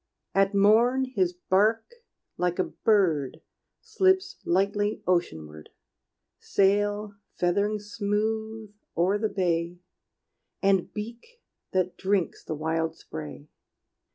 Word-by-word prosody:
At 195 +1 +2
morn 230 +6 +4
his 195 -9 0
bark 210 - +1 0.4
like 180 -1 -1
a 185 - +2 0.2
bird 160 - +2 0.4
Slips 380 -4 +1
lightly 200 +3 0
oceanward 80 - -2 0.7
Sail 205 +1 +1 0.2
feathering 200 +4 +1
smooth 215 +1 -3 0.2
o'er 190 +5 +2
the 220 0 0
bay 175 -2 -1 0.8
And 195 -2 +2
beak 235 - -8 0.3
that 185 -1 0
drinks 190 -3 -1
the 155 - -4
wild 160 +1 -1
spray. 75 - -9
200 Hz, 100 wpm, -27 LUFS, 175-215 Hz, 0.8 s, morn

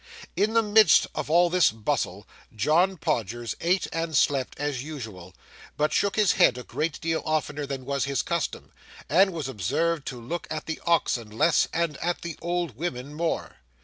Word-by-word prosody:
In 215 +2 +1
the 230 0 +4
midst 210 -4 +6
of 155 -1 -4
all 175 +2 +4
this 180 -1 +5
bustle 110 -4 -2 0.3
John 165 - +2
Podgers 120 - -2
ate 180 +3 +2
and 165 -2 -1
slept 135 -3 +1
as 145 -4 -2
usual, 110 - -8 0.4
but 150 +1 +1
shook 200 -1 +1
his 210 -3 +4
head 125 - +4
a 125 - -6
great 150 +6 -3
deal 165 -1 -1
oftener 150 -2 -2
than 135 -2 -5
was 140 0 -1
his 140 -1 -1
custom, 170 -2 -3 0.4
and 190 +5 +4
was 160 -6 -4
observed 135 - -1
to 125 - -5
look 145 +8 -5
at 155 - -4
the 160 - -5
oxen 130 -9 +1
less, 115 +10 +3
and 165 -3 -1
at 175 +1 -2
the 170 -3 -5
old 175 -6 -2
women 140 -2 -4
more. 165 +2 -3
155 Hz, 180 wpm, -26 LUFS, 130-170 Hz, 0.4 s, midst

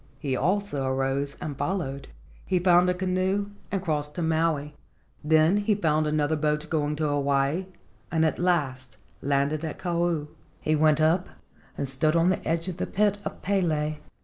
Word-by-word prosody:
He 135 -4 -2
also 185 -2 0
arose 135 +2 -1
and 145 - -5
followed. 140 -5 -3 0.4
He 185 - +2
found 180 0 +4
a - - +3
canoe 190 +2 0 0.2
and 195 -2 -1
crossed 150 -3 -2
to 175 - -2
Maui. 160 -2 0 0.5
Then 160 +5 +4
he 205 +1 +2
found 155 -5 +1
another 150 0 +1
boat 150 0 0
going 150 -2 0
to 155 0 -1
Hawaii 140 +4 +1 0.4
and 160 -1 +2
at 160 - 0
last 145 -8 -1 0.2
landed 140 +2 0
at 160 - -4
Kau. 170 -3 0 0.3
He 155 - +1
went 155 0 +4
up 165 +4 +2 0.5
and 140 - -2
stood 145 +4 +1
on 165 +2 +4
the 185 - 0
edge 165 +2 0
of 180 -2 -4
the - - -2
pit 205 0 +1
of - - -6
Pele. 155 -6 0
155 Hz, 170 wpm, -26 LUFS, 145-180 Hz, 0.5 s, found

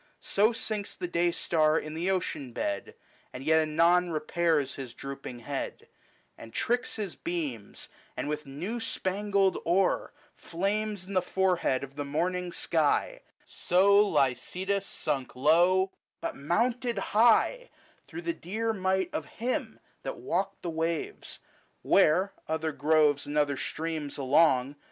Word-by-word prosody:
So 210 +3 +2
sinks 215 -3 -4
the 180 - -4
day 175 0 +2
star 155 -2 +2
in 155 -1 -4
the 170 +4 -1
ocean 155 -9 -2
bed, 100 -3 -3 0.4
And 125 - -8
yet 160 +2 +4
anon 170 +3 +3
repairs 155 -3 0
his 130 -4 -8
drooping 135 -3 -7
head, 140 +1 -5 0.5
And 115 - -10
tricks 245 - -1
his 205 -5 -4
beams, 145 -12 -5 0.3
and - - -2
with 150 0 -3
new 175 +13 -4
spangled 200 -2 0
ore 185 +3 +1 0.3
170 - - -17
Flames 200 +2 -1
in 200 - -7
the 185 - +3
forehead 180 -10 +1
of 140 +1 -9
the 145 - -2
morning 175 +5 -1
sky: - - 0 0.2
So 200 +3 +4
Lycidas 190 +4 0
sunk 135 -4 -3
low, 175 +7 +4 0.3
but - - -4
mounted 235 - 0 0.2
high, 240 - +4 0.4
Through 330 - -7
the 335 - -1
dear 220 - -2
might 190 -2 0
of 150 - -3
Him 250 +3 -2 0.2
that - - -5
walked 195 +3 -2
the 170 - -2
waves, 165 - -3 0.5
Where, 190 +1 +4
other 160 0 -1
groves 150 0 +2
and 145 +1 -3
other 145 -1 +2
streams 155 0 -4
along, 135 -1 +4
LYCIDAS. 145 - -14
170 Hz, 140 wpm, -29 LUFS, 150-195 Hz, 0.5 s, yet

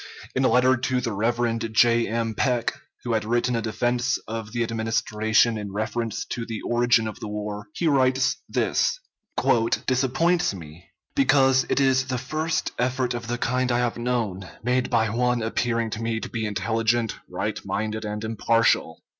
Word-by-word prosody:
In 130 - +1
a - - +5
letter 130 +1 +4
to 130 +1 0
the 120 -2 -2
Rev. 115 +2 0
J. 115 +1 +3
M. 115 +1 -1
Peck, 120 +1 0 0.3
who 120 - -1
had 110 - +1
written 120 +2 0
a 115 - 0
defense 120 +3 0
of 110 -1 -5
the 120 +1 0
Administration 110 0 +1
in 100 -1 -6
reference 110 +2 -3
to 120 - -2
the 115 -2 -5
origin 120 -2 +2
of 110 - -7
the - - -6
war, 105 0 -5
he 170 - -2
writes: 130 -1 +2
this - - +1 0.9
"disappoints 135 - +1
me, 85 0 -11 0.3
because 135 -1 +4
it - - +2
is 130 -1 +3
the 130 -1 -1
first 155 +6 -2
effort 125 0 0
of 120 -2 -5
the 120 +1 -2
kind 125 +1 0
I 120 - +2
have 120 -1 0
known, 115 -6 -2
made 125 +1 +1
by 115 -2 +2
one 125 0 +1
appearing 115 0 -1
to 105 - -4
me 115 -1 -1
to - - -6
be 110 -2 -2
intelligent, 115 +2 0
right - - -3
minded, 110 +1 -3
and 105 0 -4
impartial." 115 -6 +1
115 Hz, 170 wpm, -24 LUFS, 110-125 Hz, 0.9 s, a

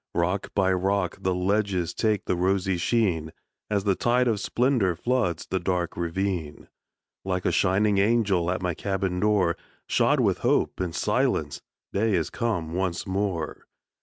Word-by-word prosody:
Rock 90 +4 0
by 95 -1 +3
rock 95 0 0
the 95 -1 0
ledges 95 -2 0
Take 110 -3 0
the - - 0
rosy 95 +1 +1
sheen, 85 -4 0 0.4
As 100 -2 0
the 100 -1 +2
tide 120 +6 +2
of 110 -3 +1
splendor 120 -6 +1
Floods 100 -4 -1
the 95 - -2
dark 90 -2 -1
ravine. 85 -2 -3 0.5
Like 90 -1 -2
a - - +3
shining 100 +2 +2
angel 100 -5 +2
At 90 +1 -2
my 90 -1 0
cabin 95 0 -2
door, 100 -5 +2 0.3
Shod - - +2
with - - +2
hope - - +1
and 90 -3 -3
silence, - - 0 0.3
Day 105 0 +2
is 85 -3 -1
come 90 -9 -2
once 90 -1 -2
more. 95 -4 -3
95 Hz, 155 wpm, -26 LUFS, 90-105 Hz, 0.5 s, by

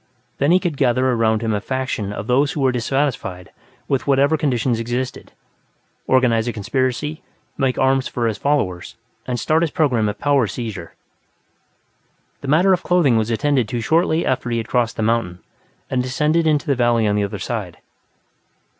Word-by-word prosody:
Then 140 - +2
he 180 - +5
could 175 -6 -3
gather 130 -1 +2
around 110 -2 +1
him 110 -1 0
a 105 - -1
faction 130 -5 -3
of 105 0 -5
those 135 +4 +2
who 150 - -3
were 130 -1 +3
dissatisfied 125 -7 -2 0.4
with 135 0 -1
whatever 140 +3 +3
conditions 125 -5 0
existed, 120 +2 -4 0.8
organize 125 -3 +3
a - - 0
conspiracy, 130 +7 -2 0.3
make 135 -3 0
arms 130 0 +2
for 120 - -2
his 110 -2 -1
followers, 95 -12 -1 0.3
and 125 -1 -2
start 155 +7 +1
his 170 - +1
program 125 -9 +1
of 105 - -5
power 140 -3 +2
seizure. 105 -5 -6 1.5
The 140 - -7
matter 175 +7 +4
of 180 - 0
clothing 170 -9 +3
was 110 0 +1
attended 130 0 +1
to 120 +2 -3
shortly 160 +6 +1
after 125 -1 -1
he 120 - -1
had 115 0 -3
crossed 120 -2 0
the 110 - -1
mountain 110 -6 0 0.5
and 130 -1 0
descended 150 +6 +1
into 150 0 +1
the 145 - +2
valley 120 -3 +2
on 105 - +1
the 105 - +1
other 100 - -4
side. - - -5
125 Hz, 175 wpm, -20 LUFS, 115-145 Hz, 1.5 s, he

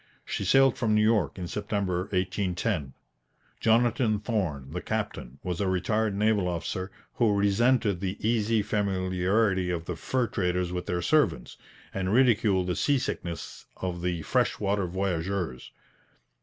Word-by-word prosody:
She - - -3
sailed 135 +5 +5
from 110 -3 +2
New 105 - +4
York 105 -9 +2
in 90 -2 -4
September 100 -2 -2
1810. 90 - -1 0.7
Jonathan 115 -1 +3
Thorn, 90 - -2
the 90 +2 -4
captain, 105 - -4
was 90 +1 -3
a 100 - +1
retired 100 +3 0
naval 105 -2 +2
officer, 90 +2 -3 0.2
who 110 -4 +2
resented 100 0 +2
the 95 +1 -3
easy 110 -1 +2
familiarity 95 -1 +1
of 85 -2 -2
the 90 - -4
fur 125 +9 0
traders 90 -4 -1
with 90 0 -4
their 90 -1 -1
servants, 145 - +1 0.4
and 95 -1 -1
ridiculed 110 -6 +3
the 90 -1 -1
seasickness 90 - -2
of 90 -2 -4
the 85 -2 -2
fresh - - +1
water 100 -2 0
voyageurs. 90 -5 -2
95 Hz, 140 wpm, -27 LUFS, 90-110 Hz, 0.7 s, sailed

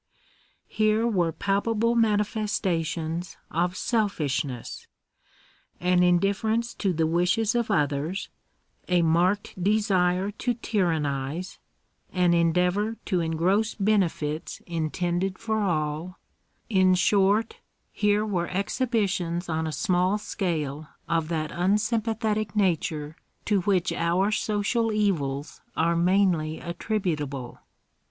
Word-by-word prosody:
Here 215 +1 +2
were 180 -8 +1
palpable 215 +5 0
manifestations 195 -7 0
of 175 +3 0
selfishness 155 - -2 0.5
— - - -33
an 180 - +4
indif 180 +3 +3
ference 230 +2 -1
to 195 - +1
the 165 -2 +1
wishes 180 +7 +1
of 235 -2 0
others, 150 +1 0 0.6
a 175 -1 +3
marked 180 +3 +1
desire 195 -2 +2
to 240 +3 -2
tyrannise, 165 - -2 0.5
an 180 -2 +3
endeavour 180 +6 +2
to 185 -4 0
engross 175 +7 +1
benefits 180 -7 0
intended 175 +3 -2
for 220 -1 -1
all 160 -1 -2 0.3
— - - -44
in 185 -4 +4
short, 200 +4 +2 0.3
here 210 0 +1
were 180 -5 -1
exhibitions 195 -5 -1
on 160 0 -1
a - - -2
small 185 +2 +1
scale 155 -8 -3 0.2
of 165 -2 0
that 155 -2 -2
unsympathetic 215 +2 0
nature 160 -6 0 0.3
to 205 -3 +2
which 185 -1 +1
our 180 +5 +1
social 215 +2 0
evils 155 -10 -1 0.2
are 170 +1 +2
mainly 170 -3 +2
attributable. 160 - -3
185 Hz, 105 wpm, -26 LUFS, 165-210 Hz, 0.6 s, an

